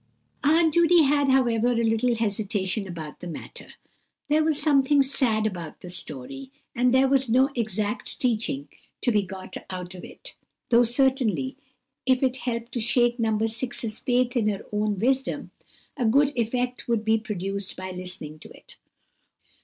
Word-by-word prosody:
Aunt 320 +2 +4
Judy 340 -1 +5
had, 285 0 +2
however, 245 -2 +3
a 230 0 +1
little 225 +2 +2
hesitation 205 -2 -1
about 160 -4 -8
the 180 - -7
matter. 170 - -9 0.6
There 310 +1 +3
was 310 -2 +2
something 285 -1 +4
sad 240 -5 +1
about 175 -7 -5
the 180 - -8
story; 180 - -7 0.3
and 250 0 +3
there 260 +1 +4
was 265 -2 +2
no 260 +4 +4
exact 215 -2 -3
teaching 220 - 0 0.3
to 245 - +2
be 210 -2 +3
got 190 -1 -8
out 180 -1 -6
of 180 - -10
it, - - -11 0.4
though 235 0 +6
certainly 260 +1 +1 0.5
if 260 0 +3
it 260 0 +1
helped 235 -2 -4
to 240 - -2
shake 240 +1 +2
No. 225 -1 +1
6's 225 +1 -2
faith 245 0 +1
in 225 -4 +2
her 200 -2 -2
own 210 -1 0
wisdom, 260 +6 0 0.4
a 250 - -1
good 280 +5 +3
effect 245 +1 -2
would 230 -2 0
be 220 0 +3
produced 200 -2 -4
by 185 0 -5
listening 180 -4 -7
to - - -11
it. - - -15
235 Hz, 160 wpm, -25 LUFS, 205-260 Hz, 0.6 s, though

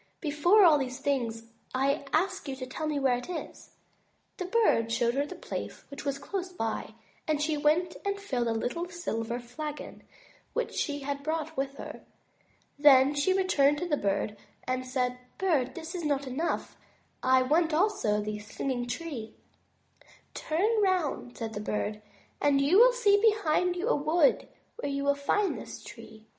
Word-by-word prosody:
Before 340 +7 +4
all 300 -6 +6
things, 250 -4 -2 0.3
I 275 +2 +1
ask 375 +2 0
you 270 - -3
to 260 -1 -6
tell 310 +5 -4
me 295 -2 0
where 255 -3 +2
it 250 - -10
is." 350 - -7 0.7
The 365 - -3
Bird 365 - +2
showed 235 0 +2
her 280 +2 0
the - - -8
place - - -6
which 280 +1 -8
was 280 -1 -1
close 370 +5 -4
by, 225 -8 -4 0.3
and 305 -2 +1
she 305 +1 0
went 305 +4 +2
and 400 0 -1
filled 255 -12 -1
a - - +1
little 250 +10 -2
silver 240 -9 -3
flagon 295 +5 -7 0.5
which - - -2
she 290 -2 -2
had 280 0 -3
brought 315 +1 -3
with 275 0 -2
her. - - -8 0.8
Then 280 -1 +7
she 290 +6 +1
returned 300 -7 +3
to 350 - -3
the 305 - +2
Bird 200 -2 -1 0.3
and 255 0 -2
said: 250 -1 -1 0.2
"Bird, 310 -10 +1
this 330 0 -7
is 355 -2 -4
not 285 -2 0
enough, 270 +6 -2 0.5
I 260 0 +4
want 320 +5 +2
also 305 - +2
the 210 0 -4
Singing 245 +4 -3
Tree." 245 -4 -5 1.0
"Turn 420 +8 +1
round," 360 -10 0
said 225 -1 -4
the 205 - -4
Bird," 210 0 -2 0.4
and 285 -1 +4
you 295 +9 +5
will - - +8
see 410 -5 +3
behind 360 -5 +2
you 360 +5 -2
a - - +3
wood 305 +1 +2 0.3
where 285 - -3
you 280 0 -2
will 280 0 +3
find 325 +8 0
this - - -9
tree." 220 0 -12
290 Hz, 170 wpm, -29 LUFS, 255-350 Hz, 1.0 s, will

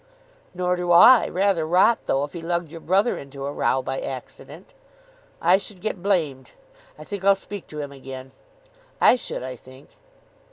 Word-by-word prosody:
"Nor 180 0 0
do 175 0 -1
I. 225 +8 +7
Rather 190 -3 +1
rot, 180 +8 +3
though, 135 +1 +1
if 145 - -6
he 170 - -7
lugged 170 -1 -3
your 165 -1 -9
brother 195 +8 +1
into 140 0 -8
a 140 - -3
row 130 -2 0
by 135 +1 -3
accident." 130 -2 -9 0.7
"I 175 +3 +4
should 200 -1 -7
get 205 -2 -4
blamed. 160 -9 -1 0.4
I - - -10
think 200 -2 -7
I'll 200 0 +5
speak 200 0 -9
to 150 - -8
him 145 -1 -7
again." 130 -1 -10 0.7
"I - - +6
should, 240 - -5
I 130 0 -6
think." 130 +3 -16
170 Hz, 175 wpm, -23 LUFS, 135-190 Hz, 0.7 s, I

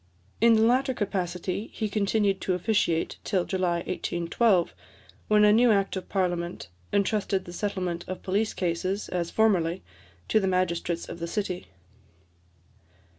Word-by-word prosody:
In 230 0 +6
the 220 - +4
latter 255 +3 +2
capacity 185 0 -3
he 215 - -2
continued 200 -1 +1
to 185 - 0
officiate 180 -4 0
till 185 -4 0
July 175 -3 0
1812, 175 +2 +1 0.5
when 210 0 +5
a 210 - +6
new 240 +2 +5
Act 195 -2 +1
of 190 - -6
Parliament 175 - -2 0.2
entrusted 200 -1 0
the 175 - -9
settlement 180 -3 -3
of 185 - -6
police 205 +3 0
cases, 185 +3 -2
as 175 -2 -2
formerly, 190 -5 +2 0.4
to 220 - +3
the 195 - 0
magistrates 175 -2 -1
of - - -8
the 170 - -3
city. 185 -1 -3
190 Hz, 140 wpm, -27 LUFS, 175-210 Hz, 0.5 s, In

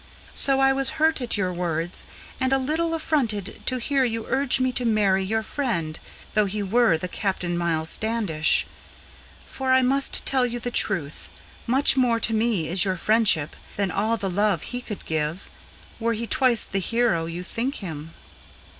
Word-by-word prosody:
So 270 -1 +2
I 270 0 +4
was 270 0 +1
hurt 315 -2 +2
at 240 -3 -2
your 185 -2 -1
words, 170 -1 -2 0.3
and 260 0 +1
a 270 - +4
little 320 +5 -1
affronted 240 - -1
to 255 - +1
hear 270 +2 +1
you 230 -2 -1
Urge 270 0 +1
me 255 0 +1
to 250 - -1
marry 205 -4 +2
your 220 +3 -1
friend, 200 - -2 0.3
though 215 -1 +3
he 205 +1 -3
were 210 -3 +3
the 180 - -4
Captain 180 -2 -2
Miles 165 -2 0
Standish. 215 -9 +1 0.8
For 265 -1 -3
I 260 0 +5
must 275 +2 +2
tell 265 -2 +3
you 240 0 -1
the 245 +1 -4
truth: 165 -11 -1 0.4
much 265 +4 +3
more 245 -3 +2
to 225 - 0
me 220 -7 +1
is 180 +2 +3
your 190 -2 -1
friendship 205 -6 +2 0.2
Than 200 -2 -1
all 220 +3 0
the 200 - -3
love 205 +2 +1
he 245 0 -5
could 210 -5 -8
give, 160 +3 -3 0.5
were 230 0 0
he 230 +1 -3
twice 245 -1 +2
the 195 - -2
hero 195 -6 +1
you 170 +2 -5
think 240 +8 -3
him." 160 -4 -7
220 Hz, 180 wpm, -24 LUFS, 180-255 Hz, 0.8 s, I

